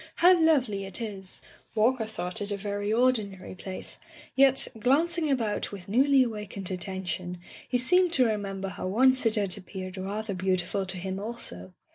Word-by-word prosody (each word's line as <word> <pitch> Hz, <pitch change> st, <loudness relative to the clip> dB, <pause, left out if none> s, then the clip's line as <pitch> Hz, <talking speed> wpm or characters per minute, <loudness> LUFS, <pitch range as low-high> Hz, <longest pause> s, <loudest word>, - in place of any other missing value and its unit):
How 360 Hz, +2 st, +6 dB
lovely 270 Hz, -, +2 dB
it 195 Hz, -, -4 dB
is!" 195 Hz, -5 st, -7 dB, 0.3 s
Walker 225 Hz, +1 st, +2 dB
thought 180 Hz, -4 st, -4 dB
it 205 Hz, -, 0 dB
a 200 Hz, -, -1 dB
very 205 Hz, +1 st, -3 dB
ordinary 220 Hz, -5 st, +1 dB
place, 185 Hz, 0 st, -7 dB, 0.4 s
yet, 270 Hz, 0 st, +5 dB
glancing 310 Hz, +7 st, +2 dB
about 230 Hz, -6 st, -1 dB
with 195 Hz, -3 st, -9 dB
newly 265 Hz, +5 st, +4 dB
awakened 210 Hz, -5 st, -5 dB
at 180 Hz, -1 st, -4 dB
tention, 185 Hz, -1 st, -3 dB, 0.3 s
he 250 Hz, -, +2 dB
seemed 360 Hz, +8 st, +4 dB
to 260 Hz, -5 st, +5 dB
remember 195 Hz, -3 st, -2 dB
how 185 Hz, -, -5 dB
once 255 Hz, +5 st, +3 dB
it 220 Hz, -, +3 dB
had 200 Hz, -4 st, 0 dB
appeared 185 Hz, 0 st, -8 dB
rather 200 Hz, +3 st, -3 dB
beautiful 185 Hz, +1 st, -1 dB
to 190 Hz, 0 st, -4 dB
him 190 Hz, +1 st, -4 dB
also. 95 Hz, -, -7 dB
205 Hz, 165 wpm, -28 LUFS, 190-255 Hz, 0.4 s, How